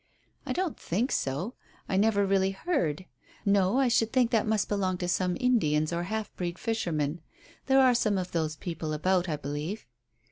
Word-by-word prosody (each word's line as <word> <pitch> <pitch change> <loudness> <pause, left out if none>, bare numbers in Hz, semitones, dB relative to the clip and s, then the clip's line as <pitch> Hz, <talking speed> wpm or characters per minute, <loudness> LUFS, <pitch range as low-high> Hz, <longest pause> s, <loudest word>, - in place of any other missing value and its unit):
"I - - -2
don't 365 -4 -2
think 220 +10 -1
so. 145 - -1 0.3
I 190 - -1
never 205 0 +3
really 195 -1 +2
heard. 190 - -1 0.4
No; 200 +2 +3
I 270 -1 +4
should 230 -2 +2
think 250 -3 +2
that 225 -2 +2
must 215 -2 +1
belong 190 -3 0
to 180 - -3
some 180 0 0
Indians 155 - +2
or 170 +1 -1
half 220 +2 -4
breed 175 -1 -3
fishermen. 170 -9 -2 0.5
There 270 0 +5
are 255 -1 +6
some 215 -4 +1
of 180 -1 -3
those 160 -2 -1
people 160 -1 -4
about, 180 +3 +1
I 155 - 0
believe." 150 +8 -5
190 Hz, 180 wpm, -28 LUFS, 170-225 Hz, 0.5 s, are